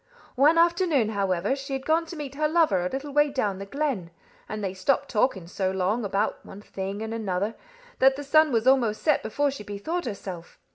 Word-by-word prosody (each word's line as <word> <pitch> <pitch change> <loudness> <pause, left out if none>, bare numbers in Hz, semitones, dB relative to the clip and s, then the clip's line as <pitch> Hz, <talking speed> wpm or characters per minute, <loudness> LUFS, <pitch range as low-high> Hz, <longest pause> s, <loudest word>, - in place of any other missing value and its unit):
One 295 +5 +4
afternoon, 335 - +3
however, 200 +2 0
she 275 0 -6
had 270 0 -3
gone 325 +1 +2
to 340 - -8
meet 290 -3 -6
her 305 +2 +1
lover 310 - +2
a 180 - -1
little 275 +5 -5
way 295 0 +4
down 210 -9 -1
the 195 - -7
glen; 270 - -2 0.4
and 215 -1 -4
they 190 -1 -2
stopped 270 +9 0
talking 210 -5 +1
so 185 +2 -2
long, 190 +5 0
about 200 +1 -1
one 200 +2 -11
thing 195 +2 -5
and 220 0 -4
another, 205 -1 -2 0.5
that 265 0 +5
the 290 - -6
sun 310 +2 +4
was 230 -1 +1
almost 250 -5 +3
set 305 -3 +3
before 285 +6 0
she 265 -6 -8
bethought 260 - -4
herself. 190 -6 -7
235 Hz, 205 wpm, -26 LUFS, 195-290 Hz, 0.5 s, that